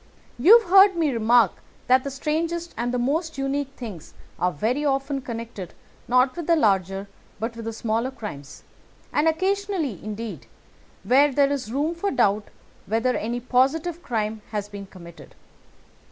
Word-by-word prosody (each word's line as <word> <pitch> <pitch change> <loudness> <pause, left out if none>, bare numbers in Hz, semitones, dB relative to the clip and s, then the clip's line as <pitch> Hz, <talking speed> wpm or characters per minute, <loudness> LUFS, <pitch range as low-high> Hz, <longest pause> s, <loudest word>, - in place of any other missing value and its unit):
You 390 - +9
have 440 - -11
heard 390 0 +8
me 320 -4 +1
remark 230 -3 +4 0.3
that 255 +1 +4
the 280 - -3
strangest 330 +5 -2
and 240 +1 -2
most 320 +6 -1
unique 275 0 -2
things 210 -10 -9 0.2
are 180 - +1
very 235 - -1
often 275 -1 0
connected 230 -7 -7 0.3
not 255 +2 +3
with 345 -3 -6
the 335 - +5
larger 195 - +1 0.3
but 230 +2 -3
with 230 -1 -8
the 225 - -2
smaller 225 +2 -1
crimes, 205 - -9 0.5
and 300 +2 +2
occasionally, 370 - -1
indeed, 215 +1 -6 0.6
where 280 +3 +4
there 280 +1 +3
is 255 -6 -3
room 295 +6 0
for 345 +4 -2
doubt 205 - +2 0.4
whether 230 +5 +1
any 235 +3 -2
positive 290 +8 +1
crime 220 -6 -2
has 210 -1 -3
been 200 -1 -9
committed. 170 -3 -14
255 Hz, 155 wpm, -24 LUFS, 220-300 Hz, 0.6 s, You